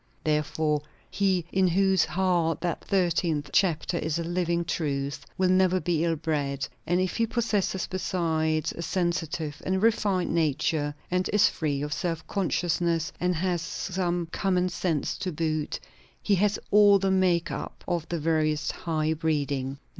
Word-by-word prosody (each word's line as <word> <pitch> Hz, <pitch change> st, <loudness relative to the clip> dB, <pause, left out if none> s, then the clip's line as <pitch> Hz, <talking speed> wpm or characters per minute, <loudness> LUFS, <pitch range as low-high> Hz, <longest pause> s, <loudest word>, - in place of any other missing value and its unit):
Therefore 150 Hz, 0 st, 0 dB, 0.3 s
he 190 Hz, -4 st, +1 dB
in 190 Hz, 0 st, +3 dB
whose 190 Hz, 0 st, +3 dB
heart 175 Hz, -3 st, +1 dB
that 175 Hz, -3 st, -2 dB
thirteenth 170 Hz, -6 st, 0 dB
chapter 170 Hz, -2 st, +2 dB
is 155 Hz, 0 st, -1 dB
a 170 Hz, -, -2 dB
living 170 Hz, 0 st, 0 dB
truth, 140 Hz, -3 st, -2 dB
will 185 Hz, -1 st, +3 dB
never 185 Hz, 0 st, +4 dB
be 170 Hz, -3 st, 0 dB
ill 165 Hz, -1 st, +1 dB
bred; 145 Hz, -4 st, -2 dB, 0.2 s
and 175 Hz, +2 st, +2 dB
if 185 Hz, -1 st, -1 dB
he 230 Hz, -1 st, +2 dB
possesses 210 Hz, -5 st, 0 dB
besides 160 Hz, -4 st, 0 dB
a -, -, -7 dB
sensitive 170 Hz, -4 st, -2 dB
and 190 Hz, +2 st, 0 dB
refined 205 Hz, -6 st, +2 dB
nature, 150 Hz, -2 st, 0 dB, 0.2 s
and 180 Hz, 0 st, +1 dB
is 210 Hz, 0 st, +5 dB
free 145 Hz, -4 st, -2 dB
of 150 Hz, 0 st, -2 dB
self 165 Hz, -2 st, -3 dB
consciousness, 170 Hz, -3 st, 0 dB
and 180 Hz, 0 st, +1 dB
has 175 Hz, 0 st, 0 dB
some 175 Hz, 0 st, -2 dB
common 185 Hz, -2 st, +1 dB
sense 170 Hz, -4 st, -1 dB
to 190 Hz, -2 st, -2 dB
boot, 155 Hz, -1 st, -2 dB, 0.4 s
he 205 Hz, -, 0 dB
has 200 Hz, +2 st, +2 dB
all 205 Hz, -1 st, +7 dB
the 195 Hz, 0 st, 0 dB
make 180 Hz, -3 st, +2 dB
up -, -, -6 dB
of 170 Hz, -3 st, -2 dB
the 170 Hz, -, -1 dB
veriest 155 Hz, -1 st, +1 dB
high 160 Hz, -2 st, -1 dB
breeding. 145 Hz, -4 st, -1 dB
170 Hz, 155 wpm, -27 LUFS, 155-185 Hz, 0.4 s, all